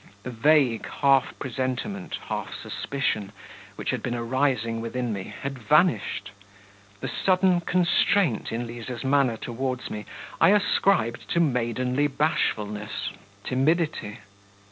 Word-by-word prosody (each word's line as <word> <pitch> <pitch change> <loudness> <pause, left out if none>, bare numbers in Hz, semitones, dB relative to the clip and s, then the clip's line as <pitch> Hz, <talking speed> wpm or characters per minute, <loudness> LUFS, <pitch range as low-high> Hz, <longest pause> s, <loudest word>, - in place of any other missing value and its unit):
The 125 - -5
vague 130 -1 +3
half 135 -2 +2
presentiment, 130 - -3
half - - -4
suspicion, 110 -8 -2 0.4
which - - -2
had - - -2
been 120 -1 -2
arising 115 -2 0
within 120 0 -2
me, 95 -2 -4 0.2
had 135 -1 -4
vanished. 150 - +2 0.7
The - - -2
sudden 185 -1 +2
constraint 175 - +2
in 115 +2 -2
Liza's 120 +1 -6
manner 135 -4 +2
towards 125 +2 -4
me 105 0 -6 0.3
I - - +7
ascribed 195 - +2
to 170 - +2
maidenly 125 -1 +1
bashfulness, 105 -8 -1 0.3
timidity.... 135 -5 0
130 Hz, 115 wpm, -26 LUFS, 115-150 Hz, 0.7 s, I